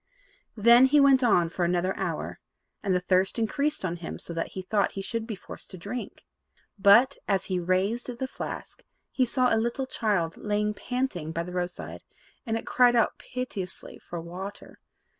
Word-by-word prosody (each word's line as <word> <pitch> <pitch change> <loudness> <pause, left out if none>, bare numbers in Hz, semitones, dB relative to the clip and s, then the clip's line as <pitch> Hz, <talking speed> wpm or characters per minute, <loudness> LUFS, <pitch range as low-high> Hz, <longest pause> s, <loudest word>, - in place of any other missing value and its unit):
Then 235 +4 +7
he 295 +2 +4
went 275 -2 +6
on 180 -8 +4
for 175 +1 -2
another 175 +2 +1
hour, - - -3 0.4
and 195 -3 +1
the - - +3
thirst 185 +3 +1
increased 280 +3 0
on 175 -1 -2
him 170 - -6
so 170 - -4
that 165 0 -3
he 190 - -3
thought 200 +1 +1
he 195 - -4
should 230 +2 -3
be 220 - -4
forced 185 - -11
to 185 - -8
drink. 240 +8 -7 0.5
But, 225 +8 +6
as 195 -2 +1
he 180 - +1
raised 190 +7 0
the 265 +1 -2
flask, - - -7 0.3
he 255 - +2
saw 250 0 +2
a 225 - +3
little 235 +3 -1
child 200 -10 -1
lying 210 0 0
panting 225 -10 -3
by 170 0 -1
the 180 +1 -8
roadside, 180 0 -4 0.5
and 225 0 0
it - - -6
cried 245 -1 +4
out 230 - +2
piteously 240 -8 -4
for 175 - -7
water. 185 +4 -8
205 Hz, 180 wpm, -27 LUFS, 180-245 Hz, 0.5 s, Then